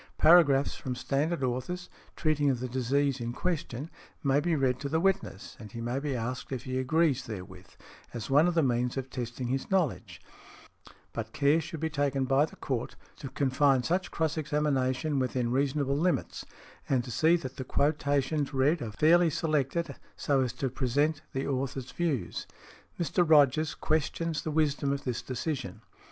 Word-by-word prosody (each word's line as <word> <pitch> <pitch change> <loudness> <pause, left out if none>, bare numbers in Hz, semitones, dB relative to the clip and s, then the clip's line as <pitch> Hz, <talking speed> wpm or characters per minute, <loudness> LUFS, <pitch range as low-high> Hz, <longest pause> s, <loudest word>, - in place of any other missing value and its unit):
Paragraphs 155 -4 +6
from 125 -1 -4
standard 140 +4 -1
authors, 130 +9 -2 0.3
treating 150 -2 +1
of 130 -3 0
the 130 - -3
disease 130 +2 0
in 120 0 -3
question, 155 -4 -3 0.4
may 140 0 +3
be 165 +2 +1
read 130 -3 +1
to 140 - -4
the 160 +2 +1
witness, 190 - -1
and 105 -3 -11
he 115 - -6
may 120 +3 -2
be 140 -2 -2
asked 125 +3 -4
if 130 -2 -3
he 130 0 -2
agrees 140 -1 +1
therewith, 95 -5 -8 0.4
as 120 -3 -5
one 145 +5 +5
of 175 - 0
the 165 - +4
means 125 0 0
of 130 -1 -4
testing 120 0 -4
his 135 +1 -2
knowledge; 160 - -1 0.9
but 110 -1 -5
care 145 +3 +3
should 160 0 -7
be 160 - +1
taken 140 -3 0
by 135 +3 +3
the - - -14
court 125 -4 -3 0.2
to 135 - -7
confine 135 -1 +2
such 180 +5 0
cross 160 -1 -1
examination 145 -2 0
within 125 -2 -1
reasonable 140 +1 +1
limits, 170 +4 -1 0.4
and 130 -3 +2
to 125 - -7
see 160 +9 +4
that 130 -6 -5
the 130 - -3
quotations 145 +1 0
read 145 +5 +2
are 115 - -3
fairly 170 +6 +5
selected 155 -1 -1 0.2
so 140 -2 +1
as 125 -2 0
to 125 +2 -3
present 145 +4 0
the 135 +1 -2
author's 135 -2 -3
views. 140 - -2 0.5
Mr. 175 +1 +2
Rogers 155 -1 +4
questions 160 +1 -1
the - - -4
wisdom 145 -2 +1
of 140 0 -2
this 125 -3 -2
decision. 130 - -4
140 Hz, 170 wpm, -29 LUFS, 130-155 Hz, 0.9 s, Paragraphs